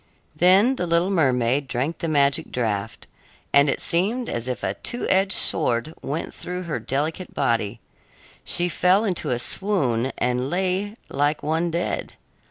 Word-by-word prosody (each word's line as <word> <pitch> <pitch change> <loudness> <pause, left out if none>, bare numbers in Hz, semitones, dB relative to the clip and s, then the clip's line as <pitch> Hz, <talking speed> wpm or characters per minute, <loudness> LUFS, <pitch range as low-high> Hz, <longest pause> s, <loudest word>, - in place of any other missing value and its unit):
Then 195 +9 +4
the 180 - -2
little 170 +3 +2
mermaid 135 -5 +1
drank 135 +6 -2
the 165 - -2
magic 140 -3 +2
draft, 110 -3 -3 0.5
and 140 +1 +6
it - - 0
seemed 215 +9 0
as 120 +1 -4
if 125 -4 -4
a 95 - 0
two 240 - -4
edged 190 0 +3
sword 120 +6 +1
went 150 +4 -4
through 180 +1 -6
her 170 -3 -3
delicate 155 +7 -3
body. 115 -5 0 0.6
She 175 - +3
fell 185 +4 +3
into 180 -6 -1
a 125 - +1
swoon 130 - 0
and 125 +1 0
lay 190 +4 -1
like 145 +1 0
one 160 +3 0
dead. 170 +1 -3
155 Hz, 155 wpm, -23 LUFS, 125-180 Hz, 0.6 s, and